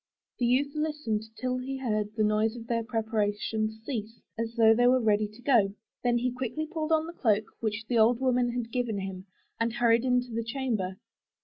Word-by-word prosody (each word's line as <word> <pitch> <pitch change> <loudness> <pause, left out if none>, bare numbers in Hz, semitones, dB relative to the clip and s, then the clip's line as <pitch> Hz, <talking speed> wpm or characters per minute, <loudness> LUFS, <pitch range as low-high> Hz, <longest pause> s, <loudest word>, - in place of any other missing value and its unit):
The 245 - +2
youth 275 +4 +2
listened 300 -9 -2
till 255 0 -1
he 265 +1 -4
heard 215 -5 -2
the 215 - +2
noise 215 +2 +2
of 230 -1 -8
their 230 0 -1
preparations 220 -1 -1
cease, 225 -4 -4 0.2
as 230 0 -3
though 225 -2 +6
they 245 +2 +4
were 255 +1 +5
ready 215 -2 +2
to 215 +3 -16
go, 215 -8 +3 0.3
then 240 -1 +3
he 250 +1 0
quickly 255 +5 -3
put 315 -1 -3
on 315 0 +3
the 335 - -7
cloak 215 -8 +2
which 220 0 -2
the 235 0 +1
old 230 +2 +5
woman 250 -2 +2
had 240 -2 -3
given 245 -4 -1
him, 190 0 -6 0.3
and 230 0 0
hurried 235 0 +3
into 250 -2 +1
their 230 - -1
chamber. 225 -6 -2
230 Hz, 200 wpm, -28 LUFS, 215-250 Hz, 0.3 s, though